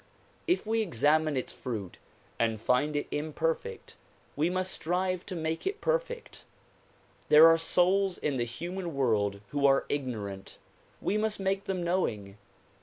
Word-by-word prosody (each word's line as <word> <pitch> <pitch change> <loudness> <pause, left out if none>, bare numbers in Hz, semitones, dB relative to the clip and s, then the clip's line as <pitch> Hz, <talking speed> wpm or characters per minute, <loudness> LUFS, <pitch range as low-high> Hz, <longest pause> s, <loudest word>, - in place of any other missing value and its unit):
If 355 -5 +1
we 225 +1 +1
examine 155 - +2
its 130 - -3
fruit 105 -7 -6 0.4
and 115 -2 +1
find 125 +7 +1
it 145 - 0
imperfect 155 +2 -3 0.4
we 155 +4 +1
must 185 +1 -1
strive 185 +2 -1
to 185 - -5
make 160 - -2
it 390 - -2
perfect. - - -2 0.9
There 150 +2 +9
are 165 - +7
souls 180 +3 +2
in 145 -3 -1
the 120 - +1
human 170 +7 -5
world 105 -7 +1
who 140 -1 +2
are 135 0 +3
ignorant; 105 -9 -4 0.4
we 210 - 0
must 215 -1 -1
make 195 +1 -1
them 185 -3 -2
knowing. 105 - -1
160 Hz, 145 wpm, -29 LUFS, 125-185 Hz, 0.9 s, There